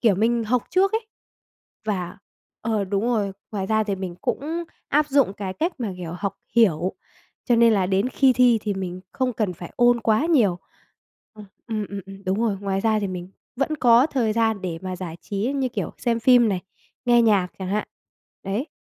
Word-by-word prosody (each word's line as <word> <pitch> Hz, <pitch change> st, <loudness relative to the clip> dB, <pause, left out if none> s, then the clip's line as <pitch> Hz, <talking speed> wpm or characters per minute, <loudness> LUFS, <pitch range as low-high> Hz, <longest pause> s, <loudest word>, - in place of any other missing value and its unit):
kiểu, 220 Hz, -5 st, +4 dB
mình 230 Hz, +4 st, +1 dB
học 245 Hz, +2 st, +1 dB
trước 390 Hz, +2 st, +3 dB
ấy, 445 Hz, 0 st, -1 dB, 0.8 s
và 185 Hz, -5 st, -3 dB, 0.4 s
ờ, 215 Hz, -3 st, 0 dB
đúng 200 Hz, +2 st, -1 dB
rồi. 210 Hz, -5 st, 0 dB, 0.2 s
Ngoài 195 Hz, -2 st, -2 dB
ra 220 Hz, +1 st, +2 dB
thì 200 Hz, -, -1 dB
mình 185 Hz, -2 st, -5 dB
cũng 325 Hz, +5 st, -2 dB, 0.2 s
áp 300 Hz, +1 st, +2 dB
dụng 275 Hz, -8 st, +3 dB
cái 195 Hz, -3 st, -4 dB
cách 335 Hz, -, -1 dB
mà, 220 Hz, -5 st, -2 dB
kiểu, 170 Hz, -2 st, -6 dB
học 195 Hz, +2 st, -3 dB, 0.2 s
hiểu, 185 Hz, -5 st, +3 dB, 0.5 s
cho 240 Hz, -2 st, +3 dB
nên 230 Hz, 0 st, +6 dB
là 195 Hz, -3 st, +2 dB
đến 195 Hz, +5 st, +1 dB
khi 260 Hz, 0 st, +4 dB
thi 245 Hz, -2 st, +4 dB
thì 205 Hz, -2 st, -1 dB
mình 185 Hz, -1 st, -5 dB
không 260 Hz, -1 st, 0 dB
cần 210 Hz, -5 st, -1 dB
phải 175 Hz, 0 st, -10 dB
ôn 240 Hz, -1 st, +4 dB
quá 220 Hz, +6 st, +2 dB
nhiều. 225 Hz, -, +3 dB, 0.8 s
Ờ, 210 Hz, -, -11 dB, 0.2 s
ừm, 215 Hz, -3 st, -2 dB
ừm, 200 Hz, 0 st, -5 dB
ừm, 195 Hz, 0 st, -11 dB
đúng 190 Hz, +4 st, 0 dB
rồi. 215 Hz, -4 st, +1 dB
Ngoài 195 Hz, -1 st, -1 dB
ra 220 Hz, 0 st, +2 dB
thì 200 Hz, -, -1 dB
mình 180 Hz, 0 st, -6 dB, 0.3 s
vẫn 295 Hz, +3 st, 0 dB
có 245 Hz, 0 st, +5 dB
thời 240 Hz, -8 st, 0 dB
gian 220 Hz, -3 st, +1 dB
để 170 Hz, -3 st, -3 dB
mà 185 Hz, -1 st, -4 dB
giải 175 Hz, -3 st, -6 dB
trí 210 Hz, +7 st, -2 dB
như 265 Hz, -2 st, 0 dB
kiểu -, -, -3 dB
xem 230 Hz, -2 st, 0 dB
phim 245 Hz, -1 st, +6 dB
này, 190 Hz, -3 st, -1 dB, 0.4 s
nghe 240 Hz, -1 st, +5 dB
nhạc 205 Hz, -5 st, +3 dB
chẳng 190 Hz, -1 st, -4 dB
hạn. 210 Hz, +2 st, -1 dB, 0.6 s
Đấy. 205 Hz, +8 st, -2 dB
215 Hz, 205 wpm, -23 LUFS, 195-245 Hz, 0.8 s, nên